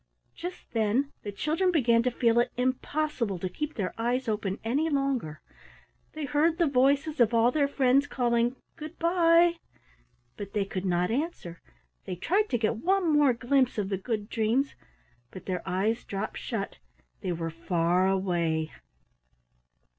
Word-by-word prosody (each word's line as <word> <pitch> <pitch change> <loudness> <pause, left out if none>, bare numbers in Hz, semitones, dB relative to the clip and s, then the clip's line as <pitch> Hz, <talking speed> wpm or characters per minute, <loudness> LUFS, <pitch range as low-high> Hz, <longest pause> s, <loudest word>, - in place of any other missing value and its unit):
Just 355 +2 -8
then 230 +5 +1
the 205 - -5
children 315 - 0
began 235 -8 +3
to 250 - +1
feel 235 -1 +2
it 240 - +2
impossible 255 -3 -1
to 185 - -3
keep 300 +12 -5
their 195 -5 -2
eyes 245 +3 0
open 210 -3 -1
any 280 +8 0
longer. 275 - -1 0.7
They 310 -1 -4
heard 310 +4 +2
the 345 - +3
voices 280 +2 +2
of 235 -1 +4
all 230 +2 +4
their 285 0 +2
friends 275 0 +2
calling 240 -2 +1 0.2
"Good 310 +1 -8
by", 340 0 +4 0.8
but 200 -1 -7
they 205 -2 0
could 190 -1 -4
not 180 +1 +1
answer. 245 - -3 0.4
They 180 - -4
tried 400 - +1
to 240 - +1
get 220 0 0
one 360 - +1
more 290 -3 +5
glimpse 255 +1 +1
of 200 -2 -1
the 195 - -1
Good 210 0 -3
Dreams, 235 +5 0 0.6
but 185 - -11
their 185 -2 -2
eyes 210 +6 0
dropped 200 +2 -4
shut 210 -5 -4 0.4
they 185 - -3
were 165 -1 -3
far 170 +2 +1
away. 170 -5 0
240 Hz, 155 wpm, -28 LUFS, 195-290 Hz, 0.8 s, more